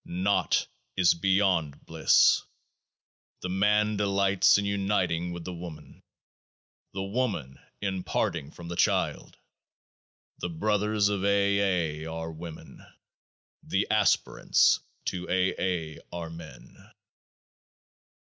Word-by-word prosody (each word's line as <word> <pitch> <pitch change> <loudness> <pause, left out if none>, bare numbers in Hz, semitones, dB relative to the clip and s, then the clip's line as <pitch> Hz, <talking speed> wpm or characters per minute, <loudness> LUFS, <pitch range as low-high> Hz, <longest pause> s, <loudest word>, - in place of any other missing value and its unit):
Naught 95 +3 +1 0.3
is 90 -2 +5
beyond 90 -4 +1
Bliss. - - +4 1.0
The 90 - -4
Man 105 +3 +2
delights 100 -1 +3
in 100 - -1
uniting 95 -4 0
with 85 -1 -6
the 90 - -5
Woman; 85 -2 -10 0.9
the 95 0 -4
Woman 100 - -2 0.2
in 95 -2 -2
parting 70 -4 -2
from 85 - -11
the 85 - -5
Child. - - 0 1.0
The 90 - -3
Brothers 105 +3 +1
of 100 -2 -2
A.. - - +2 0.8
A.', 80 - -6
are 80 0 -5
Women: 80 0 -10 0.8
the - - 0
Aspirants - - +3 0.3
to 90 0 -4
A.'. 95 0 +2
A.', 80 -5 -2
are 85 -2 -6
Men. 80 -6 -12
90 Hz, 110 wpm, -28 LUFS, 85-100 Hz, 1.0 s, is